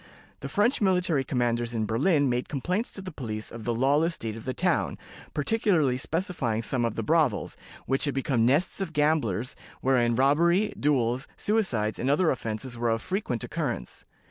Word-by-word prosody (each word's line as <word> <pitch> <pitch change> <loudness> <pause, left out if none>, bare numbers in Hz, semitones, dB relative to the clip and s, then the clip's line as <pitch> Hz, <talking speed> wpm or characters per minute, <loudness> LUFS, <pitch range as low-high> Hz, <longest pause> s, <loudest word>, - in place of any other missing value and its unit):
The 140 - -6
French 210 - +2
military 180 -7 +2
commanders 120 -2 -1
in 110 -1 0
Berlin 140 - +2
made 125 0 -1
complaints 180 - -1
to 195 - -5
the 185 - -6
police 110 -7 -5
of 115 -2 -8
the 120 -1 0
lawless 145 +7 +2
state 110 -1 -5
of 115 - -9
the 130 - -2
town, - - 0 0.4
particularly 155 - +2
specifying 135 - -2
some 120 +1 0
of 115 - -2
the 115 - -2
brothels, 150 -4 +1 0.3
which 135 +3 +1
had 145 - -2
become 135 -3 +1
nests 145 +11 +2
of 175 -4 -3
gamblers, 145 - +1 0.3
wherein 120 -3 +2
robbery, 170 - +3
duels, 130 -3 +1
suicides, 130 - 0
and 130 - 0
other 155 +4 +3
offenses 120 0 -4
were 120 0 0
of 115 0 +1
frequent 130 - -3
occurrence. - - -4
135 Hz, 170 wpm, -27 LUFS, 115-165 Hz, 0.4 s, robbery